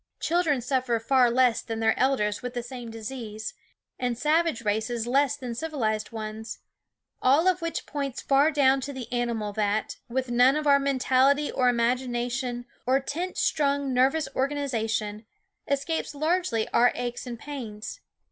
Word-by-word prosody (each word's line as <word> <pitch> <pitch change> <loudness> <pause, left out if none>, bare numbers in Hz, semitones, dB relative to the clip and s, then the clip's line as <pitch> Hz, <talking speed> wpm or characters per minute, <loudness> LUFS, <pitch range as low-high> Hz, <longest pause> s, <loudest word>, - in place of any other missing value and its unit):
Children 325 -6 +1
suffer 250 -1 0
far 250 +1 +4
less 245 -1 +3
than 225 -1 -5
their 225 0 +3
elders 210 -6 +1
with 250 0 -6
the 240 - -2
same 245 -1 -8
disease, 220 -1 -6 0.5
and 245 -2 -1
savage 310 -3 +1
races 220 +2 -1
less 275 +3 +2
than 250 -4 -5
civilized 230 -7 -2
ones; 220 0 -6 0.6
all 285 +7 +4
of 365 -1 +2
which 335 0 -3
points 280 -3 -4
far 280 +2 +3
down 275 -3 +3
to 280 +2 -5
the 250 -2 -7
animal 235 -4 -1
that, 210 0 -1
with 260 +1 -2
none 250 +3 +5
of 305 0 -1
our 280 -1 +6
mentality 275 +1 +2
or 250 -2 +2
imagination 245 0 -1 0.2
or 260 +1 +4
tense 345 +7 -4
strung 280 -2 +1
nervous 270 +5 +2
organization, 225 -6 -1 0.4
escapes 285 +2 -1
largely 310 -6 0
our 245 +1 +4
aches 245 +1 -4
and 240 -1 -5
pains. 235 - -7
255 Hz, 150 wpm, -26 LUFS, 230-280 Hz, 0.6 s, our